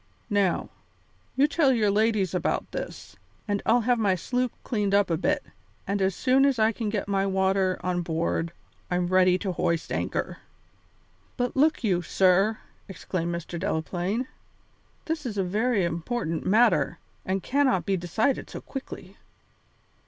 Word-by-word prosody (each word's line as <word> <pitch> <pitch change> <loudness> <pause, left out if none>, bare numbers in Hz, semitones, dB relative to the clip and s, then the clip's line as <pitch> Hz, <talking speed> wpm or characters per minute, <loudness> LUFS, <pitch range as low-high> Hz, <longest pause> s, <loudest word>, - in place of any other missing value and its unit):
Now, 200 -3 +1 0.6
you 275 +3 +4
tell 300 -2 +3
your 215 -5 +2
ladies 210 -3 +1
about 180 - -1
this, - - -7 0.3
and 205 -1 0
I'll 240 +1 +4
have 240 +1 +2
my 200 -4 +2
sloop 250 +7 -1
cleaned 205 -4 0
up 200 -3 +3
a - - +3
bit, - - 0 0.4
and 200 +1 -1
as 190 -1 +1
soon 265 +1 +3
as 275 -2 +3
I 220 0 +3
can 225 -1 -3
get 205 -2 -2
my 195 -1 +1
water 190 -1 +1
on 180 -1 0
board 165 0 -1 0.4
I'm 180 0 0
ready 185 -1 +4
to 190 0 -3
hoist 170 -2 -1
anchor." - - -2 1.0
"But 245 -1 -1
look 300 +1 +3
you, 185 -5 +2
sir," 190 +5 +3 0.3
exclaimed 175 -2 -3
Mr. 170 0 -6
Delaplaine, 180 +6 -2 0.8
"this 320 -1 -2
is 225 -6 -4
a 195 - +2
very 210 +3 +1
important 170 0 -3
matter, 225 +5 +3 0.3
and 190 0 -2
cannot 260 - +2
be 195 - +1
decided 190 +9 -1
so - - -7
quickly." 205 -7 -8
195 Hz, 150 wpm, -26 LUFS, 180-235 Hz, 1.0 s, you